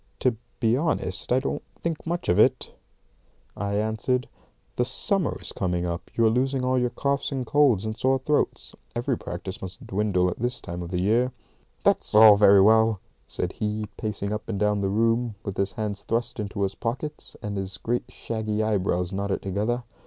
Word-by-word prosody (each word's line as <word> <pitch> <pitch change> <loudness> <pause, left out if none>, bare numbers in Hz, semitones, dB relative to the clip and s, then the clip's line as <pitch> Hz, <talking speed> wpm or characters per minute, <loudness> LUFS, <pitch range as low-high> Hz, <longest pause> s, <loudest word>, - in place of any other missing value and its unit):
"To 125 -3 +2 0.2
be 115 -1 +3
honest, 130 - -1
I 125 - +5
don't 130 - -1
think 165 -1 -4
much 175 +1 -2
of 90 +3 +3
it," 130 +3 +3 0.8
I 100 0 -2
answered. 110 +4 0 0.5
"The 125 - +2
summer 160 +8 -1
is - - -4
coming 90 -2 -1
on. 85 -1 -2 0.2
You 115 - +3
are - - +6
losing 130 +2 +1
all 130 0 +2
your 125 0 +1
coughs 140 +3 -1
and 130 -2 -2
colds 125 -6 +3
and 110 0 -3
sore 130 +4 +2
throats. 145 +3 -1 0.2
Every 120 +2 0
practice 95 -2 -6
must 95 0 -7
dwindle 95 -2 +1
at - - -7
this 125 +2 -1
time 85 +1 -6
of 85 0 -6
year." 110 +8 +2 0.5
"That's - - +2
all 110 -1 +10
very 100 -1 +7
well," 110 0 +5 0.3
said 90 - -3
he, 105 -1 -2
pacing 105 -1 -3
up 105 +1 -5
and 100 -3 -2
down 105 -1 +2
the 95 - 0
room, 115 +2 +1
with 100 -2 -4
his 100 0 -1
hands 105 -2 -3
thrust 115 0 -2
into 100 -1 -2
his 100 0 0
pockets, 135 +8 -5
and 105 -1 -3
his 95 -1 0
great 120 +4 -1
shaggy 110 -1 -2
eyebrows 95 -3 0
knotted 100 0 -2
together. 105 +6 -1
110 Hz, 185 wpm, -25 LUFS, 100-125 Hz, 0.8 s, all